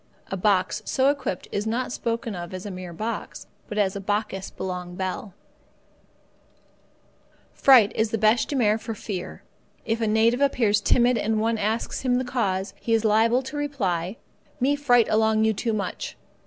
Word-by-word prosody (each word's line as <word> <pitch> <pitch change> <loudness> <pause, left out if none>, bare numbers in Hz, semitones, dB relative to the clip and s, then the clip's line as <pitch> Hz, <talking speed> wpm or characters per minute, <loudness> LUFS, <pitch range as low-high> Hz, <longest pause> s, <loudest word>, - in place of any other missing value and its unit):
A - - -1
box 190 0 +1
so 265 +1 +2
equipped 265 -10 -4
is 205 +2 -2
not 240 +3 -1
spoken 230 -2 -3
of 175 0 -6
as 185 - -7
a 205 - -5
mere 180 -1 -7
box, 220 +7 -5 0.2
but 210 - -5
as 195 -2 +2
the 200 - -5
bokkis 205 -1 -2
belong 180 -1 -5
bell. 190 +1 -4 2.2
Fright 245 -6 +6
is 220 0 +1
the 225 - -1
bêche 215 +2 +3
de 290 - -3
mer 220 -4 +2
for 225 0 -5
fear. 195 -3 -6 0.4
If 225 +1 -1
a 225 - +1
native 225 +4 +3
appears 225 -7 +2
timid 245 +2 +3
and 220 0 0
one 225 0 0
asks 220 +3 -1
him 255 -2 +1
the 255 +1 0
cause, 200 -6 -1
he 230 - +1
is 225 0 0
liable 225 +4 +3
to 260 - -7
hear 295 - -4
in 290 - -2
reply: 190 - -2 0.4
"Me 275 +3 +2
fright 245 -5 +3
along 220 0 +2
you 220 0 +3
too 225 +3 -2
much." 210 -2 -4
220 Hz, 180 wpm, -25 LUFS, 200-240 Hz, 2.2 s, Fright